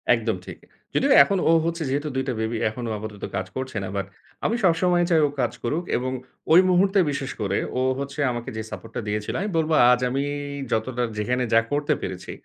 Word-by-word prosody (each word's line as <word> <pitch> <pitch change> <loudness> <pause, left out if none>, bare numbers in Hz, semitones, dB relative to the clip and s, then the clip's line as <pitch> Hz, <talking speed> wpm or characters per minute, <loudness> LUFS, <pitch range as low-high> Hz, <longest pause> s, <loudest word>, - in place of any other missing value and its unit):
একদম 115 -2 -1
ঠিক। - - -9 0.4
যদিও - - +3
এখন 195 +7 0
ও - - +7
হচ্ছে 170 0 -1
যেহেতু 145 +3 -1
২ 130 - 0
টা 130 - 0
বেবি 110 +1 -1
এখন 120 +3 -7
ও - - -2
আপাতত 105 -1 -8
কাজ 95 -1 -1
করছে 130 -3 -4
না। - - -4
বাট 100 - -1 0.4
আমি 225 - +2
সবসময় 175 0 +3
চাই 165 -3 +4
ও - - -4
কাজ 120 -2 +1
করুক 150 +8 -1
এবং 130 +1 -2 0.4
ওই 175 - +9
মুহূর্তে 190 +2 +4
বিশেষ 140 -1 -3
করে 100 -1 0 0.2
ও - - +1 0.2
হচ্ছে 140 +1 -5
আমাকে 120 -1 -5
যে - - -2
সাপোর্ট 115 - -8
টা - - -1
দিয়েছিল 105 0 -2
আমি 205 - -2
বলব 160 0 +1 0.2
আজ 125 - +4
আমি 135 +2 -1 0.5
যতটা 120 +2 0
যেখানে 125 +4 0
যা 115 - +7
করতে 145 +1 +1
পেরেছি, 90 -1 -5
130 Hz, 210 wpm, -24 LUFS, 110-160 Hz, 0.5 s, ওই